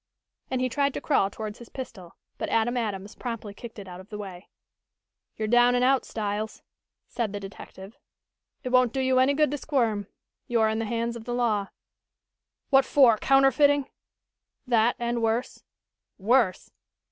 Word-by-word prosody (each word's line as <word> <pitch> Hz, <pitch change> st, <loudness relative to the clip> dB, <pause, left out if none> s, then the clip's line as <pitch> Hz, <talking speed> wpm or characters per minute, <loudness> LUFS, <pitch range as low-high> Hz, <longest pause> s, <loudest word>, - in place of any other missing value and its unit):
and 260 Hz, -1 st, -1 dB
he 255 Hz, -, +2 dB
tried 280 Hz, +2 st, 0 dB
to -, -, -2 dB
crawl 235 Hz, -10 st, +2 dB
towards 215 Hz, +1 st, -7 dB
his 240 Hz, -, -12 dB
pistol, 200 Hz, -10 st, -9 dB, 0.2 s
but -, -, -3 dB
Adam 230 Hz, +2 st, +1 dB
Adams 205 Hz, -4 st, -3 dB
promptly 230 Hz, -4 st, -6 dB
kicked 230 Hz, +3 st, -10 dB
it 200 Hz, -2 st, -9 dB
out 180 Hz, 0 st, -9 dB
of 185 Hz, -, -13 dB
the 210 Hz, -, -6 dB
way. 190 Hz, -3 st, -9 dB, 0.9 s
"You're 215 Hz, -, -2 dB
down 240 Hz, +2 st, +5 dB
and 245 Hz, -, +2 dB
out, 265 Hz, +1 st, +3 dB
Styles," 215 Hz, 0 st, -4 dB, 0.4 s
said 225 Hz, -4 st, -3 dB
the 205 Hz, -, -3 dB
detective. 195 Hz, +1 st, -11 dB, 0.7 s
"It 255 Hz, -, -3 dB
won't 255 Hz, -2 st, +3 dB
do 270 Hz, -, -1 dB
you 260 Hz, -1 st, +2 dB
any 270 Hz, +2 st, +3 dB
good 300 Hz, -2 st, +2 dB
to 290 Hz, -, -3 dB
squirm. 230 Hz, -10 st, 0 dB, 0.4 s
You're 225 Hz, -2 st, +2 dB
in 220 Hz, +1 st, -1 dB
the 225 Hz, -, -1 dB
hands 235 Hz, +1 st, -2 dB
of 230 Hz, -1 st, -9 dB
the 240 Hz, 0 st, -3 dB
law." 215 Hz, -5 st, +1 dB, 1.0 s
"What 270 Hz, 0 st, +6 dB
for, 255 Hz, -5 st, +5 dB
counterfeiting?" 275 Hz, +1 st, +4 dB, 0.7 s
"That 235 Hz, -2 st, +3 dB
and 235 Hz, 0 st, -2 dB
worse." 225 Hz, +2 st, -1 dB, 0.6 s
"Worse?" 215 Hz, -2 st, +1 dB
235 Hz, 170 wpm, -26 LUFS, 210-255 Hz, 1.0 s, What